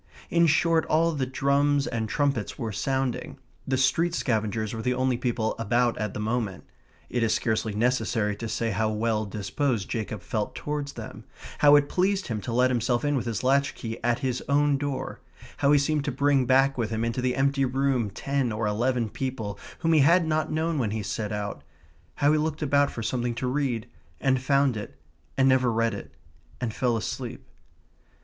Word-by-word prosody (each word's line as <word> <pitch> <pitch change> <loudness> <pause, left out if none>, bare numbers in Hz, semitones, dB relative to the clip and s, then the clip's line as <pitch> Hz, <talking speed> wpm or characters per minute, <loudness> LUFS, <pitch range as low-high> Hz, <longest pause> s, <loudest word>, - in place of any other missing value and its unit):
In 170 0 +4
short, 165 +1 +3
all 165 +2 +3
the 140 -5 -2
drums 140 +2 +2
and 115 -7 -3
trumpets 140 -7 -1
were 115 -2 -3
sounding. 135 +6 -2 0.3
The 130 0 +1
street 165 +6 +2
scavengers 110 -2 -1
were 110 - -4
the 125 +2 0
only 130 0 +1
people 120 -2 -1
about 120 +2 +2
at 105 -2 -3
the - - -3
moment. 110 -3 -2 0.5
It 120 - 0
is 110 -1 +2
scarcely 110 -2 -1
necessary 115 -2 +1
to 115 +1 -5
say 115 0 -1
how 110 +2 0
well 110 0 0
disposed 105 +3 -2
Jacob 110 -3 -4
felt 105 -2 -3
towards 145 -1 -4
them; - - -9 0.3
how 145 0 +7
it 145 -1 +4
pleased 190 +2 0
him 110 -3 -2
to 120 - -5
let 125 +2 +3
himself 120 +2 0
in 145 0 +1
with 125 -2 -2
his 115 0 -2
latch 140 +2 +2
key 115 -2 -6
at 120 0 +2
his 125 -1 -1
own 145 0 +3
door; 135 -2 -4 0.4
how 140 0 +3
he 150 - +6
seemed 145 +1 +1
to 145 - 0
bring 140 -1 +2
back 135 +1 +3
with 110 -2 0
him 110 0 -1
into 115 +2 -2
the 125 0 0
empty 140 +1 +2
room 130 -3 +1
ten 135 +4 -1
or 110 +1 -2
eleven 120 +3 0
people 110 -3 -4 0.2
whom 165 0 +2
he 155 - +5
had 170 +5 +5
not 155 0 0
known 160 0 0
when 115 -5 0
he 110 0 -3
set 105 +2 -3
out; 100 -8 -4 0.5
how 145 +1 +3
he 155 - +3
looked 155 0 -2
about 145 0 +3
for 115 - -6
something 120 +2 -1
to 125 - -3
read, 125 -4 -1 0.3
and 130 -2 +2
found 140 -1 +2
it, 105 - -7 0.4
and 135 0 +4
never 130 -2 +4
read 115 0 +1
it, 100 - -8 0.5
and 110 - -2
fell 120 -1 +1
asleep. 110 - -5
125 Hz, 195 wpm, -26 LUFS, 110-140 Hz, 0.5 s, how